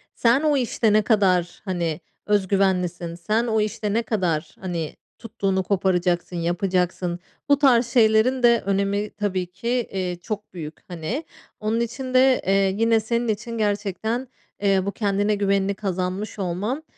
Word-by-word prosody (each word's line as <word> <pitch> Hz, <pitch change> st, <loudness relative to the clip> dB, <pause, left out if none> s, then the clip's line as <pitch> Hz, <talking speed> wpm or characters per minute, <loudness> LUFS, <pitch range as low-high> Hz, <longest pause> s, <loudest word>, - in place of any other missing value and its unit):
sen 240 Hz, +4 st, +3 dB
o 300 Hz, -2 st, +2 dB
işte 230 Hz, -3 st, +1 dB
ne 215 Hz, -, +5 dB
kadar, 185 Hz, -5 st, +2 dB
hani, 175 Hz, -4 st, -2 dB, 0.3 s
öz 205 Hz, -2 st, +2 dB
güvenlisin, 180 Hz, -3 st, 0 dB
sen 215 Hz, +8 st, 0 dB
o 220 Hz, -1 st, +2 dB
işte 210 Hz, -1 st, -2 dB
ne 230 Hz, +2 st, +1 dB
kadar, 180 Hz, -9 st, -1 dB
hani, 170 Hz, -4 st, -4 dB, 0.2 s
tuttuğunu 195 Hz, -4 st, -1 dB
koparacaksın, 180 Hz, -2 st, 0 dB
yapacaksın? 175 Hz, 0 st, -1 dB, 0.3 s
Bu 285 Hz, -, +6 dB
tarz 245 Hz, -4 st, +4 dB
şeylerin 235 Hz, +2 st, +3 dB
de 235 Hz, -1 st, +5 dB
önemi 200 Hz, +1 st, 0 dB
tabii 190 Hz, -3 st, -1 dB
ki, 185 Hz, +6 st, -9 dB
eee, 190 Hz, -7 st, -1 dB
çok 210 Hz, -1 st, -6 dB
büyük, 160 Hz, -3 st, -7 dB
hani. 180 Hz, -, -4 dB, 0.4 s
Onun 220 Hz, +2 st, 0 dB
için 255 Hz, +2 st, -4 dB
de, 255 Hz, 0 st, +5 dB
eee, 195 Hz, 0 st, +3 dB
yine 225 Hz, 0 st, +3 dB
senin 235 Hz, +2 st, -1 dB
için 225 Hz, +2 st, -3 dB
gerçekten, 210 Hz, +4 st, -1 dB, 0.3 s
eee, 195 Hz, -2 st, +3 dB
bu 200 Hz, -, -1 dB
kendine 205 Hz, 0 st, 0 dB
güvenini 200 Hz, 0 st, +1 dB
kazanmış 190 Hz, +1 st, -3 dB
olman, 200 Hz, -, -2 dB
200 Hz, 150 wpm, -23 LUFS, 185-225 Hz, 0.4 s, Bu